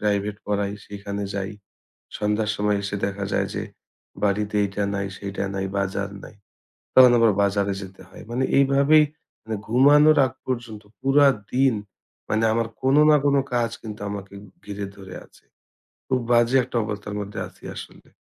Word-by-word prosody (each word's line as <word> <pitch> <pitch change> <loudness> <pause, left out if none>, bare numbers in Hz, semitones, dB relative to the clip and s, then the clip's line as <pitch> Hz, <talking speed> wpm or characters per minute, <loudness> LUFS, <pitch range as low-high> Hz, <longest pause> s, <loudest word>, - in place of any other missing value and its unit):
private 105 0 -1
পড়াই, 100 -1 -1
সেইখানে 100 0 -5
যাই। 100 0 -3 0.7
সন্ধ্যার 105 0 0
সময় 105 0 +1
এসে 100 +1 -3
দেখা 100 0 -4
যায় - - +1
যে - - -2 0.6
বাড়িতে 105 +1 0
এইটা 100 +1 -3
নাই, 100 0 -2
সেইটা 100 0 -4
নাই, 95 - -2
বাজার 100 0 -2
নাই। 105 - -12 0.6
তখন 130 -1 +9
আবার 115 -2 +5
বাজারে 100 0 +1
যেতে 95 0 -11
হয়। 95 - -13
মানে 125 +2 0
এইভাবেই 140 +3 +5 0.4
মানে 110 -1 -3
ঘুমানোর 145 +5 +6
আগ 125 - -6
পর্যন্ত 120 -4 -4 0.2
পুরা 140 +2 +4 0.3
দিন 130 -1 +3 0.6
মানে 110 +1 +1
আমার 115 0 0
কোন 135 +2 +3
না 150 - +7
কোন 140 0 +3 0.2
কাজ 120 -1 +1
কিন্তু 110 -2 -8
আমাকে 100 -1 -7 0.3
ঘিরে 100 -1 -5
ধরে 95 -2 -10
আছে। - - -24 0.6
খুব 130 - +1
বাজে 120 +2 +4
একটা 120 - -4
অবস্থার 105 -1 -5
মধ্যে 100 0 -6
আছি - - -21
আসলে। - - -11
105 Hz, 160 wpm, -23 LUFS, 100-125 Hz, 0.7 s, তখন